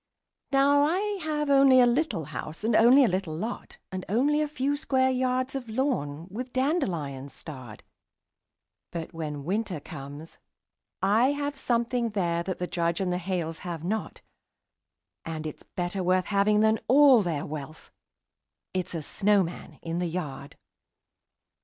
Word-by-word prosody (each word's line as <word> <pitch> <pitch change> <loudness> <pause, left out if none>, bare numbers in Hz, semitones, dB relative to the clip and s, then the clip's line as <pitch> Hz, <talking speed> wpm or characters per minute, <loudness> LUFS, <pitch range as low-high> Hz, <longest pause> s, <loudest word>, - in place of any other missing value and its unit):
Now 280 +1 +4
I 320 +5 +2 0.2
have 300 -2 -1
only 275 -2 +7
a 250 - +7
little 240 - 0
house, 155 +4 -7
and 220 0 +2
only 245 +5 +7
a - - +4
little 180 -4 -2
lot, 225 +8 -5
And 185 -1 -4
only 285 +8 +2
a 305 - +1
few 290 -1 -1
square 260 -3 +1
yards 255 0 0
of 260 -4 -5
lawn, 180 - -1
with 245 +4 -6
dandelions 170 - -1
starred; 130 -9 -9 1.1
But 170 0 -6
when 150 -3 -5
Winter 195 -2 -1
comes, 145 +1 -9 0.6
I 225 +8 +4
have 285 0 -3
something 235 -2 0
there 175 -5 0
that 185 +1 -4
the 180 - -2
Judge 170 -1 -1
and 185 -2 0
the 180 - -1
Hales 170 -3 -3
have 170 -3 -6
not, 215 +5 -3 1.0
And 160 -1 -5
it's 155 - -6
better 180 +2 -4
worth 185 0 +2
having 210 +1 +3
than 220 0 +3
all 270 -2 +7
their 165 -6 -2
wealth 155 +1 -8 0.8
it's 185 -2 -3
a 160 - -3
snowman 195 -1 0
in 165 +1 -3
the 180 - 0
yard. 145 -5 -5
195 Hz, 150 wpm, -27 LUFS, 165-255 Hz, 1.1 s, only